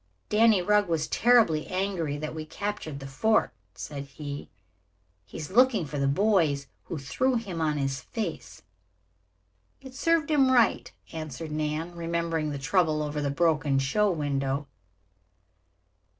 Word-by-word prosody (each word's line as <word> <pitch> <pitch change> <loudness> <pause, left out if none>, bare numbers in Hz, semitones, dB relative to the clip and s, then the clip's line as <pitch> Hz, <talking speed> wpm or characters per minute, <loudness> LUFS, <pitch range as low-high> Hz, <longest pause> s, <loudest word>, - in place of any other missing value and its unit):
"Danny 215 -3 +4
Rugg 210 0 +3
was 160 -2 0
terribly 225 -10 +3
angry 185 -6 -2
that 155 +1 -5
we 160 -1 -5
captured 160 -4 -5
the 135 - -8
fort," 180 +12 +1 0.2
said 140 -1 -6
he. 140 +1 -7 0.8
"He - - -9
is 155 +2 -6
looking 245 -4 +4
for 145 0 -5
the 140 - +1
boys 160 -4 +2 0.2
who 170 - -5
threw 160 - 0
him 195 -8 -3
on 155 -2 +1
his 135 -2 -2
face." 165 - -6 1.2
"It 265 -1 -12
served 320 +2 +1
him 275 -3 +4
right," 240 -3 +3 0.2
answered 155 -1 -6
Nan, 155 +3 -3
remembering 165 -2 -1
the 145 - -4
trouble 155 +1 +1
over 150 0 -3
the 145 - 0
broken 150 -2 +1
show 170 +11 +2
window. 140 -4 -1
160 Hz, 140 wpm, -27 LUFS, 145-205 Hz, 1.2 s, Danny